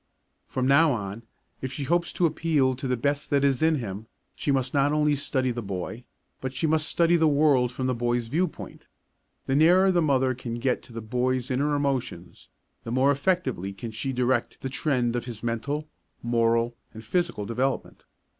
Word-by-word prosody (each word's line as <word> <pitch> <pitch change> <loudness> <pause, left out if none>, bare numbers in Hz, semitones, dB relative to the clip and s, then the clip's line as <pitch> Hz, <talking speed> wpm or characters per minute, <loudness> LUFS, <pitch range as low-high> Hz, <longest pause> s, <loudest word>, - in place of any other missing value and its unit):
From 130 - -2
now 145 +2 +5
on, 105 -1 -5 0.4
if 130 - -4
she 140 - -4
hopes 170 +4 +1
to 175 - +2
appeal 155 -5 +2
to 135 +2 -5
the 125 -1 0
best 140 +4 -1
that 140 -1 +2
is 135 -3 +2
in 160 0 +4
him, 110 -4 -5 0.3
she 145 - -1
must 130 -2 0
not 140 0 +3
only 150 0 +2
study 130 -2 -1
the 120 0 -4
boy, 100 +4 -5 0.3
but 130 0 -4
she 160 - -1
must 155 0 +1
study 170 0 +3
the 160 -1 +4
world 140 -4 +3
from 130 +1 -4
the 130 - +1
boy's 120 0 0
viewpoint. 160 +8 -3 0.6
The 135 - 0
nearer 180 +6 +5
the 175 -2 +2
mother 130 -4 +2
can 120 -2 -6
get 125 +2 0
to - - -16
the 115 0 -6
boy's 125 +3 -1
inner 145 +3 +1
emotions, 130 -11 -3 0.3
the 115 - -6
more 130 +3 +3
effectively 140 - -1
can 110 +4 -7
she 125 +5 -3
direct 125 -1 0
the 135 - -3
trend 125 -4 0
of 120 - -2
his 120 -3 -8
mental, 140 +6 -2 0.4
moral 115 0 +1 0.2
and 110 0 -10
physical 170 - -1
development. 130 +5 -2
130 Hz, 190 wpm, -26 LUFS, 120-145 Hz, 0.6 s, now